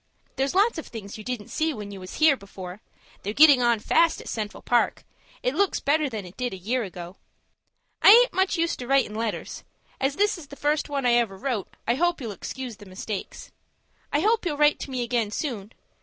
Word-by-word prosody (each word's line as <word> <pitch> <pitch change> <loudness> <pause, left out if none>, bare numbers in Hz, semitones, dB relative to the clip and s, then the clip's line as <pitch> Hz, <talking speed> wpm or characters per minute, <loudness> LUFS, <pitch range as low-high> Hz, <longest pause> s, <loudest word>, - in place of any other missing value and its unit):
There's 270 +4 -1
lots 405 -2 +3
of - - -8
things 215 -2 -8
you - - -8
didn't 225 -2 -5
see 315 -1 -1
when 205 -1 -7
you 195 - -8
was 185 0 -9
here 310 -2 +5
before. 195 -3 -10 0.4
They're 205 - -3
getting 290 -4 +7
on 235 -2 +3
fast 330 +9 +3
at - - -11
the - - -5
Central 210 -2 -5
Park. 240 -1 +1 0.4
It 250 - +1
looks 395 +5 +1
better 295 +1 +1
than 215 -5 -5
it 180 - -12
did 245 -5 -2
a - - -8
year 230 +8 -1
ago. 180 -3 -8 0.8
"I - - +8
aint 485 +4 +8
much 380 0 +1
used 335 0 0
to 245 - -6
writin' 270 -5 +2
letters. 220 0 -4 0.4
As 270 +1 0
this 415 0 +1
is 300 - -11
the 285 - -11
first 290 +2 0
one 280 -2 -2
I 245 - +4
ever 230 -5 +1
wrote, 220 -2 -3
I 235 - +3
hope 345 +6 +1
you'll 235 -5 -5
excuse 245 +3 -7
the 205 - -13
mistakes. 190 +2 -6 0.6
I 290 - +2
hope 440 +4 +2
you'll 320 -5 -2
write 295 0 +4
to - - -6
me 255 -2 -2
again 235 -3 0
soon. 220 -4 -4
250 Hz, 220 wpm, -25 LUFS, 210-300 Hz, 0.8 s, I